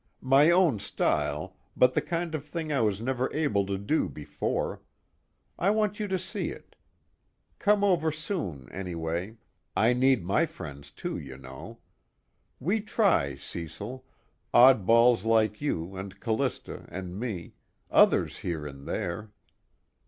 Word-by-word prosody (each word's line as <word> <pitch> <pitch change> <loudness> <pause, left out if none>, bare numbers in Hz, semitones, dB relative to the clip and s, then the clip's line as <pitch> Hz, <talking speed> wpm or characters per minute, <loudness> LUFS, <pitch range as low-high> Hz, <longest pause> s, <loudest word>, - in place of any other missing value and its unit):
"My 135 +4 +6
own 170 - +4
style, - - -1 0.2
but 125 0 +5
the - - +2
kind 170 -1 -3
of 155 -3 -3
thing 155 0 -4
I 135 - +2
was 105 -3 +1
never 130 +2 -1
able 105 -11 +1
to 100 -1 -1
do 100 +11 0
before. 75 - -3 0.8
I 190 - +3
want 210 -1 +1
you 210 - -1
to 190 -1 0
see 185 +1 -3
it. - - -11 0.8
Come 205 0 +3
over 175 -5 +3
soon 150 - -4
anyway 90 +2 -4 0.4
I 115 +3 +4
need 130 -6 +3
my 150 - +2
friends 70 - -9
too, - - -5
you 65 -2 -9
know. 65 0 -10 0.8
We 200 - 0
try, 195 - +2
Cecil, 85 - -7 0.5
oddballs 120 -2 +6
like 110 -1 +2
you 95 - -2
and 95 +1 -7
Callista 110 -1 -2
and 95 +1 -6
me, 105 -8 -4 0.4
others - - +4
here 80 -4 -3
and 70 -1 -9
there. 100 +5 -3
115 Hz, 135 wpm, -28 LUFS, -, 0.8 s, My